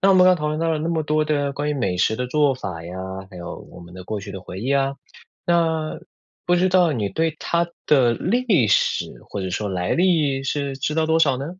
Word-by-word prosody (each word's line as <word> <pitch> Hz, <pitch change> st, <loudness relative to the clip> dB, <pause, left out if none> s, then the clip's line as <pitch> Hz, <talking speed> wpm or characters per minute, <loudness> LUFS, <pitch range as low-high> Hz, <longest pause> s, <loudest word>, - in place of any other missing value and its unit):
那 195 Hz, -, +4 dB
我 195 Hz, -, +6 dB
们 185 Hz, -, +6 dB
刚 -, -, +7 dB
刚 185 Hz, -, +5 dB
讨 150 Hz, -2 st, -2 dB
论 155 Hz, 0 st, -2 dB
到 165 Hz, -, +1 dB
了 160 Hz, -, 0 dB
那 160 Hz, +2 st, -2 dB
么 165 Hz, -2 st, 0 dB
多 155 Hz, 0 st, +1 dB
的 145 Hz, -2 st, 0 dB
关 145 Hz, +2 st, -3 dB
于 -, -, -1 dB
美 95 Hz, -10 st, -1 dB
食 110 Hz, +5 st, +2 dB
的 125 Hz, -, -2 dB
做 145 Hz, +1 st, +2 dB
法 90 Hz, -9 st, -6 dB
呀， 90 Hz, +2 st, -7 dB, 0.4 s
还 95 Hz, -, -12 dB
有 85 Hz, -, -7 dB
我 -, -, -12 dB
们 85 Hz, 0 st, -13 dB
的 90 Hz, 0 st, -9 dB
过 105 Hz, +2 st, -4 dB
去 100 Hz, 0 st, -8 dB
的 95 Hz, -, -7 dB
回 90 Hz, 0 st, -8 dB
忆 130 Hz, +5 st, 0 dB
啊， 135 Hz, 0 st, +1 dB, 0.5 s
那 160 Hz, -2 st, +1 dB, 0.5 s
不 175 Hz, -, +3 dB
知 185 Hz, +2 st, +3 dB
道 180 Hz, -3 st, +4 dB
你 110 Hz, -7 st, -1 dB
对 160 Hz, +3 st, -1 dB
它 170 Hz, 0 st, 0 dB, 0.2 s
的 125 Hz, -5 st, +4 dB
历 200 Hz, -, +2 dB
史 105 Hz, -, +2 dB, 0.2 s
或 100 Hz, -, -4 dB
者 95 Hz, -, -3 dB
说 105 Hz, +3 st, -2 dB
来 90 Hz, -1 st, -2 dB
历 160 Hz, -7 st, +2 dB
是 140 Hz, 0 st, -2 dB
知 150 Hz, +2 st, -1 dB
道 160 Hz, 0 st, +2 dB
多 160 Hz, +1 st, +2 dB
少 140 Hz, -5 st, +3 dB
呢？ 135 Hz, +2 st, -4 dB
145 Hz, 275 characters per minute, -22 LUFS, 110-165 Hz, 0.5 s, 刚